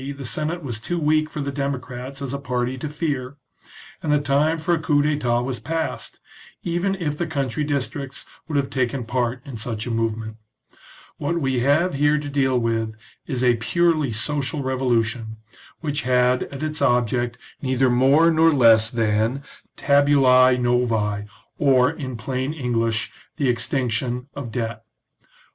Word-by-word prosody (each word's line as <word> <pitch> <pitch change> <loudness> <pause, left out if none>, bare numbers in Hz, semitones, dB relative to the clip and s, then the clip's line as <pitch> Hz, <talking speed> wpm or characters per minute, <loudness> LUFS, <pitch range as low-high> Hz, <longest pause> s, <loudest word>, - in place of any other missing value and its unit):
the 135 - -7
Senate 155 +6 -2
was 120 -5 -4
too 175 +9 -3
weak 155 -1 +2
for 150 - -5
the 140 0 -2
democrats 135 -1 -4
as 135 -1 -4
a 140 - -3
party 125 -1 -2
to 140 +4 -5
fear, 145 -3 -3 0.6
and 155 - -1
the 150 - +4
time 145 +3 +2
for 170 +2 0
a 165 - +1
coup 150 -2 +2
d'etat 130 -6 +1
was 125 -1 -3
past, 160 +8 -4 0.4
even 175 +3 0
if 155 -6 -2
the 170 +2 -2
country 140 -2 -2
districts 140 -1 -3 0.2
would 150 -3 -1
have 140 -1 0
taken 130 -1 -1
part 120 +1 -2
in 135 -4 -7
such 110 0 -4
a 120 - -3
movement. 110 -1 -2 0.8
What 170 +4 -1
we 135 -4 0
have 145 +8 +2
here 145 +2 +3
to 150 -1 -4
deal 135 -2 +1
with 115 -2 -1 0.3
is 130 -4 -2
a 120 -2 +4
purely 155 +3 +1
social 140 +5 -2
revolution, 120 -4 -1 0.4
which 145 -2 -2
had 125 0 +2
as 140 +1 -8
its 155 0 -3
object 120 -2 +1 0.2
neither 130 -1 +2
more 135 +7 +5
nor 165 0 +5
less 115 -5 +5
than 115 +3 0 0.2
" - - -37
tabulae 135 -3 +5
novael' 115 -4 0 0.3
or, 130 -2 +4
in 130 -6 -6
plain 130 +5 -3
English, 115 -6 -1 0.3
the 140 - +1
extinction 125 +1 -1
of 130 -5 -6
debt. 115 -1 -3
130 Hz, 160 wpm, -23 LUFS, 120-145 Hz, 0.8 s, more